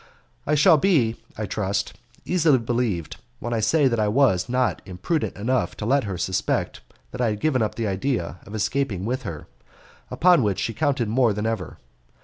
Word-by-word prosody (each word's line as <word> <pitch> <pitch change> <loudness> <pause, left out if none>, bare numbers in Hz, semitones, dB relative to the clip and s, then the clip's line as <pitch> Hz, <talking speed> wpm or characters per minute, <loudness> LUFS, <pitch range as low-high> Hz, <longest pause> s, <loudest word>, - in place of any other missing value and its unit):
I 150 - +3
shall 155 +2 +6
be, 140 - +2 0.2
I 110 - -2
trust, 100 0 -2 0.3
easily 165 -6 +3
believed 110 - -2 0.2
when 120 - -4
I 115 - 0
say 140 +7 +3
that 115 -3 0
I 105 - +2
was 105 -4 +2
not 125 0 0
imprudent 95 - -2
enough 125 +5 -1
to 105 - -4
let 135 +1 +2
her 95 -3 -4
suspect 95 +2 -1 0.3
that - - -5
I 120 - +2
had 105 -1 -3
given 130 -1 +1
up 110 - -1
the 115 - -2
idea 95 -3 -2
of 105 - -8
escaping 110 -3 -1
with 130 +3 -2
her, 85 - -7 0.6
upon 175 -3 +4
which 100 -5 0
she 115 - -2
counted 140 -4 0
more 115 0 +2
than 105 +1 -3
ever. 110 -6 -3
115 Hz, 185 wpm, -23 LUFS, 100-135 Hz, 0.6 s, shall